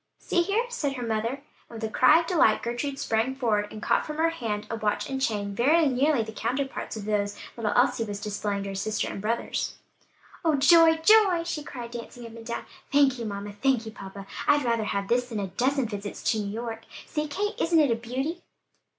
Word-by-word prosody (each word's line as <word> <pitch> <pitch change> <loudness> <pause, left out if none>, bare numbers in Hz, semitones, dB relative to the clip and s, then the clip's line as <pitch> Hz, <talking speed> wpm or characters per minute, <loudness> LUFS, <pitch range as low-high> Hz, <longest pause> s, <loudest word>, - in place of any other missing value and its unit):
"See 350 - +1
here," 405 +7 +1
said 295 - -2
her 250 -3 -4
mother, 230 +5 -2 0.3
and 230 - -8
with - - -8
a - - +1
cry 320 +8 +5
of - - -7
delight 330 - +3
Gertrude 240 +4 -3
sprang 230 +1 0
forward 215 -6 +1
and 215 - -8
caught - - +2
from 305 0 -6
her 330 +1 +2
hand 220 -9 -3
a - - -1
watch 210 -1 -1
and 265 -1 -3
chain 205 -5 -1
very 305 +10 +4
nearly 275 -1 +2
the 220 - -7
counterparts 255 +2 -3
of 205 - -6
those 205 -1 -1 0.2
little 220 -3 -1
Elsie 250 -1 +3
was 205 -1 -5
displaying 205 -1 -2
to 200 - -5
her - - -5
sister 205 +2 -1
and - - -5
brothers. 230 +3 -2 0.7
"Oh, 320 -3 +3
joy, 325 +4 +6
joy!" 365 0 +5
she 335 -3 -3
cried, 240 -4 -8
dancing 240 0 -8
up 230 0 -10
and 230 - -10
down, 235 +1 -5 0.3
"thank 275 -3 +4
you, 230 - -4
mamma! 205 -1 -5
Thank 235 +2 +1
you, 220 - -6
papa! 195 -2 -9 0.2
I'd 290 -2 +4
rather 230 -2 +1
have 200 -1 -2
this 245 +2 +1
than 225 -3 -3
a 195 -2 -3
dozen 265 +6 +1
visits 205 -1 -6
to 220 - 0
New 205 -1 -3
York. 225 0 -5 0.2
See, 300 0 -2
Kate, 410 +9 -2
isn't 330 -1 +3
it 290 -5 +4
a - - +3
beauty?" 265 +9 -4
235 Hz, 220 wpm, -27 LUFS, 215-285 Hz, 0.7 s, joy